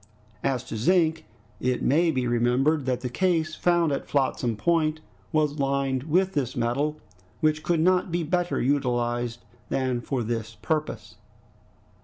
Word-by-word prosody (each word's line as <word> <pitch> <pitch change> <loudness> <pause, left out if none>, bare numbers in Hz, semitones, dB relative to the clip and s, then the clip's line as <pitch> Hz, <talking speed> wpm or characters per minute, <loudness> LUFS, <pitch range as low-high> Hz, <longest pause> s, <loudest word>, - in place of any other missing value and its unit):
As 130 -3 0
to 120 -3 -6
zinc, 160 - +2 0.3
it 125 0 0
may 165 +5 +3
be 130 -5 0
remembered 125 +5 +2
that 125 -1 0
the 125 - -2
case 160 +3 0
found 170 -1 +2
at 140 - -3
Flotsam 130 -4 0
Point 155 +3 +1 0.3
was 150 -2 +1
lined 135 -1 0
with 185 +4 +2
this 135 -4 -1
metal, 140 +6 -1 0.4
which 155 -1 +2
could 170 0 +1
not 185 +1 +2
be 170 0 0
better 175 +2 0
utilized 120 -3 0 0.3
than 130 -2 0
for 130 -1 -2
this 115 0 -3
purpose. 150 - -3
140 Hz, 145 wpm, -26 LUFS, 125-160 Hz, 0.4 s, may